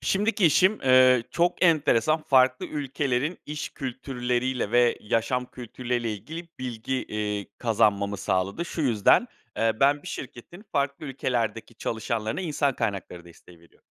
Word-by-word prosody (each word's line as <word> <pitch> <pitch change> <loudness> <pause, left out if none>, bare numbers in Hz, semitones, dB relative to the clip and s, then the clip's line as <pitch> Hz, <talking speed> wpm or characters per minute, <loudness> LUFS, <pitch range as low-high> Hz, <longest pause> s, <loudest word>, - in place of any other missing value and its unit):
Şimdiki 205 -1 +2
işim, 185 +7 +3
eee, 130 -1 +6
çok 175 +1 0
enteresan 155 -2 +3
farklı 130 -3 +3
ülkelerin 140 +1 -2
iş 150 0 -4
kültürleriyle 125 -2 -2
ve 120 0 +3
yaşam 115 +4 -1
kültürleriyle 120 -1 -3
ilgili 160 - -8
bilgi, 125 0 -4
eee, 105 -1 -3
kazanmamı 100 -3 +1
sağladı. 95 - -1
Şu 170 - -5
yüzden, 120 - +4 0.3
eee, 115 0 +2
ben 145 +1 +3
bir - - -8
şirketin 135 - -9
farklı 140 0 -1
ülkelerdeki 120 -4 -2
çalışanlarına 110 +2 -3
insan 145 -5 0
kaynakları 95 -5 -4
desteği 85 0 -17
veriyor 85 - -24
125 Hz, 130 wpm, -26 LUFS, 110-145 Hz, 0.3 s, eee